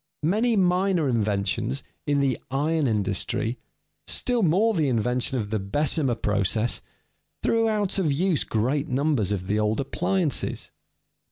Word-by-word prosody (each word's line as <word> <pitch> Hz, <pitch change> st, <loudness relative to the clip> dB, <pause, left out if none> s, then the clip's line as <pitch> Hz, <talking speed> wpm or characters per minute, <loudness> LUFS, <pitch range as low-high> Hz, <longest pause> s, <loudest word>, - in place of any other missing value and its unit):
Many 220 Hz, +8 st, +2 dB
minor 180 Hz, -3 st, +2 dB
inventions 100 Hz, -, -1 dB, 0.2 s
in 145 Hz, -1 st, +2 dB
the 135 Hz, -3 st, +1 dB
iron 150 Hz, +3 st, 0 dB
industry, 105 Hz, +2 st, -1 dB, 0.5 s
still 245 Hz, -2 st, +1 dB
more 200 Hz, +6 st, +3 dB
the 160 Hz, -7 st, +1 dB
invention 125 Hz, +2 st, +1 dB
of 105 Hz, -3 st, -4 dB
the 110 Hz, -, 0 dB
Bessemer 135 Hz, -, 0 dB
process, 105 Hz, +2 st, 0 dB, 0.6 s
threw 225 Hz, 0 st, +2 dB
out 205 Hz, -3 st, 0 dB
of 165 Hz, -6 st, +1 dB
use 170 Hz, +3 st, +1 dB
great 130 Hz, +7 st, -1 dB
numbers 135 Hz, -6 st, 0 dB
of 95 Hz, -3 st, -2 dB
the 105 Hz, +3 st, 0 dB
old 105 Hz, +1 st, 0 dB
appliances. 175 Hz, +2 st, -1 dB
140 Hz, 135 wpm, -25 LUFS, 110-180 Hz, 0.6 s, more